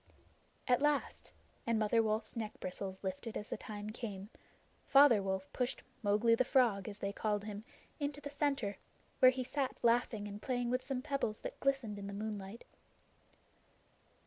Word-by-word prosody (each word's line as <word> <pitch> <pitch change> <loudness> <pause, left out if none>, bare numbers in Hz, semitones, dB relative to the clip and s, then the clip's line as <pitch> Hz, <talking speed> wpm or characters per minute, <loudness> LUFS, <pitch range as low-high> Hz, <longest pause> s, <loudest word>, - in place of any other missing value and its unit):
At 250 0 +4
last 295 -1 0 0.4
and 230 -1 +3
Mother 220 +1 +3
Wolf's 220 +1 -1
neck 220 -2 -4
bristles 190 +1 -5
lifted 190 +4 -3
as 210 - -6
the - - -2
time 210 0 -6
came 210 -3 -6 0.6
Father 275 -6 +7
Wolf 190 0 -2
pushed 250 +1 -2 0.2
"Mowgli 215 +2 +4
the 230 - +4
Frog," 235 -7 +3
as 205 - -7
they 200 -1 -3
called 210 -1 -1
him, 210 0 -6 0.4
into 290 0 -2
the 285 -1 -7
center, 275 -9 0 0.4
where 255 - +9
he 255 0 -1
sat 265 +1 -2
laughing 230 -3 +2
and 205 0 -7
playing 245 -2 -1
with 255 +1 +1
some 255 -2 -3
pebbles 275 -7 -1
that - - -6
glistened 265 -7 0
in 200 - -6
the 200 - -5
moonlight. 210 0 -5
220 Hz, 165 wpm, -35 LUFS, 205-255 Hz, 0.6 s, where